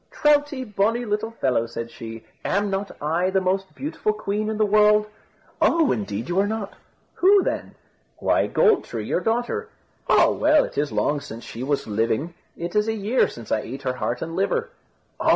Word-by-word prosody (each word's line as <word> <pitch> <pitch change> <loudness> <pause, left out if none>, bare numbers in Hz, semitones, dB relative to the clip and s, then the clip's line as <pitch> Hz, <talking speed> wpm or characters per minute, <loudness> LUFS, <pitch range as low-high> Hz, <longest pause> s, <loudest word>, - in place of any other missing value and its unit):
"Troutie, 290 -2 +2
bonny 225 +2 0
little 210 +1 -1
fellow," 130 - 0
said 115 0 -6
she, 115 0 -9 0.2
"am 200 +1 0
not 195 +1 -2
I 165 +5 +1
the 190 0 +2
most 190 +1 -1
beautiful 270 -7 -2
queen 215 0 -2
in 220 - -2
the 215 - +3
world?" 210 0 +5 0.6
"Oh! 330 -3 +4
indeed 105 +1 -3
you 175 +2 0
are 200 - +3
not." 215 -1 -4 0.4
"Who 390 +1 +5
then?" - - -3 0.4
"Why, - - +2
Gold 440 -5 +3
tree, 110 -3 -5
your - - 0
daughter." 240 - -1 0.4
"Oh! - - +5
well, 305 0 +4
it - - -7
is 145 -1 0
long 140 +7 0
since 115 -2 -9
she 115 - -8
was 140 +2 -1
living. 115 +9 -1 0.2
It 170 +3 -5
is 210 +1 +3
a 225 - +1
year 220 +5 +2
since 115 -2 -10
I 110 - +2
ate 135 +6 -7
her 130 -1 0
heart 125 -1 -2
and 165 0 -5
liver." 465 - 0 0.5
"Oh! - - +1
195 Hz, 190 wpm, -23 LUFS, -, 0.6 s, world